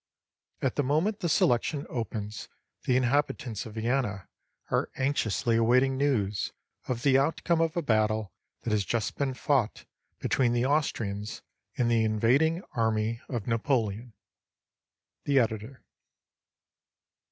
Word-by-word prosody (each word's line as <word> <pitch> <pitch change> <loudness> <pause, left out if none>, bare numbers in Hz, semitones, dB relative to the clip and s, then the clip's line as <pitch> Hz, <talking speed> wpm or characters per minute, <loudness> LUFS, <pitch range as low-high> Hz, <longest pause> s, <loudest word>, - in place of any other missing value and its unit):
At 130 - 0
the 145 - +3
moment 160 +11 +1
the 175 -5 -1
selection 140 +1 +2
opens 110 -3 -5 0.4
the 125 - +3
inhabitants 125 -4 0
of 110 - -11
Vienna 110 -4 -1 0.4
are - - +1
anxiously 120 -4 +1
awaiting 125 +4 +3
news 115 -8 0 0.3
of 120 -2 -2
the 135 -1 +5
outcome 165 +3 +1
of 165 +1 0
a 170 - 0
battle 110 - +1 0.3
that 115 - -2
has 105 -1 +2
just 115 +2 -2
been 135 -2 -1
fought 125 -4 0 0.3
between 120 -3 +1
the 120 +1 +1
Austrians 110 -8 -1 0.3
and 120 -1 +2
the 115 -1 +3
invading 130 - +2
army 110 0 0
of 115 -5 -3
Napoleon. 115 -1 -1 1.1
The 140 -1 +2
Editor. 115 +1 -1
120 Hz, 125 wpm, -28 LUFS, 110-140 Hz, 1.1 s, the